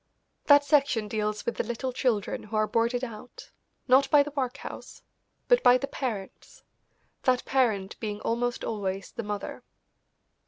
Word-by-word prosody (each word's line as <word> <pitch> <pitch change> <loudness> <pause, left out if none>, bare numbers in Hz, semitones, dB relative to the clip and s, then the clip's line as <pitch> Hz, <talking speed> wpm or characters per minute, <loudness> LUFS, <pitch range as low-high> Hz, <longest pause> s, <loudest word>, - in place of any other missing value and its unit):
That 285 -1 +7
section 275 -7 +2
deals 210 0 -2
with 235 - -2
the - - 0
little 240 +3 -4
children 235 -5 0
who 215 +1 -8
are 215 0 +3
boarded 235 +3 0
out, 250 - -9 0.4
not 270 +1 +5
by 290 -1 +6
the 295 - -7
workhouse, 275 -1 -5 0.4
but - - +5
by 245 +1 +6
the 275 - -3
parents, 225 -9 -6 0.6
that 255 -1 +1
parent 220 -8 0
being 210 -2 -4
almost 240 +1 -1
always 195 -3 -3
the - - -5
mother. 210 -2 -5
240 Hz, 150 wpm, -27 LUFS, 215-265 Hz, 0.6 s, That